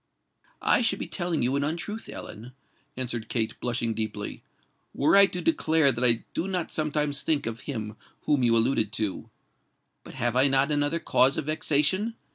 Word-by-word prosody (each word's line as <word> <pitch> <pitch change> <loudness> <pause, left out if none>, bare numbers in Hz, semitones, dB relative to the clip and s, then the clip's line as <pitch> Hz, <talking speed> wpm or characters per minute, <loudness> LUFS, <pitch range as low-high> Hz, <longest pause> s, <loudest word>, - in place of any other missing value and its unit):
"I - - +4
should 210 -4 +2
be - - -4
telling 175 -6 -3
you 130 +3 +1
an 140 - 0
untruth, 170 +9 -4
Ellen," 120 +4 -9 0.4
answered 120 -3 -4
Kate, 110 -2 0
blushing 120 -2 -1
deeply, 110 -2 -5 0.5
"were 140 - +3
I 200 0 +8
to 180 - -4
declare 160 -3 +3
that 120 0 -3
I 120 -2 +4
do 180 - -2
not 180 -3 -3
sometimes 150 -2 -1
think 150 -3 0
of 115 0 -5
him 110 -5 -4 0.3
whom 145 -3 +1
you 115 -2 +3
alluded 115 -2 +2
to. 105 -4 -3 0.7
But - - -12
have 120 0 -1
I 130 +2 +5
not 135 +2 +2
another 145 +2 +1
cause 135 -4 +3
of - - -3
vexation? 155 +8 +1
140 Hz, 175 wpm, -26 LUFS, 120-160 Hz, 0.7 s, I